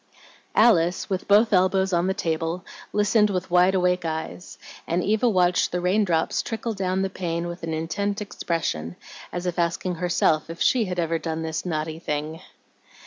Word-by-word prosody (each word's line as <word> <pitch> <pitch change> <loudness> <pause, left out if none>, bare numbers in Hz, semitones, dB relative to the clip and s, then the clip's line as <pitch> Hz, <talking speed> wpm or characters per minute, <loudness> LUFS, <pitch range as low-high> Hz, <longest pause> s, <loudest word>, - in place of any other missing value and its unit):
Alice, 180 -6 +3
with 190 -1 -2
both 210 +2 +5
elbows 190 0 +3
on 175 +1 +2
the 190 - 0
table, 165 +2 -2 0.3
listened 210 +1 +3
with 185 -2 -3
wide 180 +2 +4
awake 180 -1 +2
eyes, 160 +2 -5 0.3
and 175 +2 0
Eva 220 +4 +2
watched 180 -3 +2
the 180 - -1
raindrops 180 -2 +1
trickle 225 0 -4
clown 190 -1 -1
the 195 - -1
pane 170 -2 -3
with 175 +1 -6
an 160 -1 -3
intent 200 +6 -2
expression, 160 - -3 0.4
as 175 0 -4
if 180 -1 -2
asking 170 +2 0
herself 165 -3 +1
if 165 0 -7
she 245 -4 +3
had 180 -2 -4
ever 165 -1 0
done 160 -1 -3
this 160 +2 -3
naughty 160 -1 -3
thing. 155 +1 -4
180 Hz, 170 wpm, -24 LUFS, 165-190 Hz, 0.4 s, both